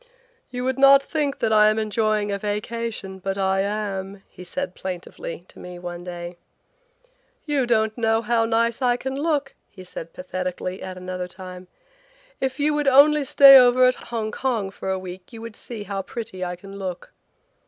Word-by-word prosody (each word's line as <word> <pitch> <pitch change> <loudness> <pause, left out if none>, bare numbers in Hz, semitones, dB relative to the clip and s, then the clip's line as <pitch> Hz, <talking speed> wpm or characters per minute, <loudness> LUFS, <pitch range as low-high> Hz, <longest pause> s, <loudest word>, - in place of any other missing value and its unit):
"You 250 0 -4
would 260 +1 -1
not 275 0 +7
think 290 -2 -2
that 220 - +1
I 215 0 +6
am 215 - 0
enjoying 215 -1 0
a 200 - -2
vacation, 210 -1 -4
but 195 +1 -3
I 190 0 +1
am," 200 -1 -3
he 180 - -12
said 275 +10 -4
plaintively 175 -2 -7
to - - -14
me 180 0 -9
one 175 0 -7
day. 175 0 -7 1.1
"You 285 -5 0
don't 220 -2 +2
know 225 -1 +1
how 230 0 +2
nice 230 +2 +1
I 245 -1 +2
can 265 +1 -4
look," 285 -2 -1 0.2
he 185 - -12
said 170 -2 -8
pathetically 185 0 -5
at 185 -1 -7
another 185 0 -5
time. 185 0 -10 0.7
"If 265 0 -2
you 300 +1 +2
would 295 -1 0
only 285 +2 +6
stay 275 0 +9
over 250 0 +5
at 255 0 0
Hong 225 -2 -2
Kong 225 -7 -2
for 190 - -6
a 190 - 0
week 185 +3 -9
you 225 - -9
would 230 -2 -8
see 230 -3 -8
how 200 -1 -3
pretty 215 -3 -6
I 180 0 -3
can 195 +2 -11
look." 185 -2 -6
215 Hz, 185 wpm, -23 LUFS, 185-250 Hz, 1.1 s, stay